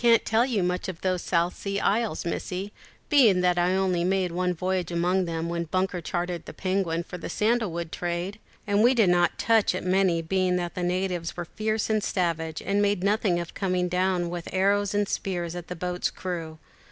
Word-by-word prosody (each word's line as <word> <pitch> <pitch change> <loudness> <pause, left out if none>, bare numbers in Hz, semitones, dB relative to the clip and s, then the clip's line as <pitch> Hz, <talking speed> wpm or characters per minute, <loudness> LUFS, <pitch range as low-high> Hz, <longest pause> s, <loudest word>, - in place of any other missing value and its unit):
_] - - -14
"I - - +4
can't 230 - +3
tell 225 +2 +3
you 220 -8 0
much 180 +1 -1
of 175 -3 -7
those 185 -2 0
South 170 0 0
Sea 200 0 -3
Isles, 210 -6 0
Missie, 185 +3 -3 0.4
being 230 - +5
that 180 -1 +2
I 180 +1 +2
only 185 -2 +1
made 185 -1 +1
one 180 +1 0
voyage 180 0 -1
among 180 +2 +1
them, 165 -1 -3
when 170 0 -2
Bunker 185 +1 -1
chartered 175 +1 -3
the - - -8
Penguin 185 -3 -1
for 180 +1 -8
the - - -6
sandal 220 -2 +1
wood 170 -1 -4
trade; 175 +4 -3 0.3
and 205 0 +2
we 245 +3 +5
did 220 -6 +4
not 175 -1 +2
touch 225 -5 +3
at - - -3
many, 185 -3 +2
being 185 +1 +1
that 175 -1 -2
the 180 - -4
natives 180 -1 -1
were 175 - -3
fierce 215 +4 -2
and 215 -1 +1
savage, 165 -3 -1
and 200 +2 +1
made 200 -2 +1
nothing 200 -3 +2
of 170 -1 -6
coming 185 -3 0
down 180 -1 0
with 175 -1 -5
arrows 200 +2 +2
and 205 0 +1
spears 175 -4 -3
at 175 -1 -7
a 180 - -4
boat's 180 +1 -2
crew. 165 -4 -5
180 Hz, 215 wpm, -26 LUFS, 175-200 Hz, 0.4 s, being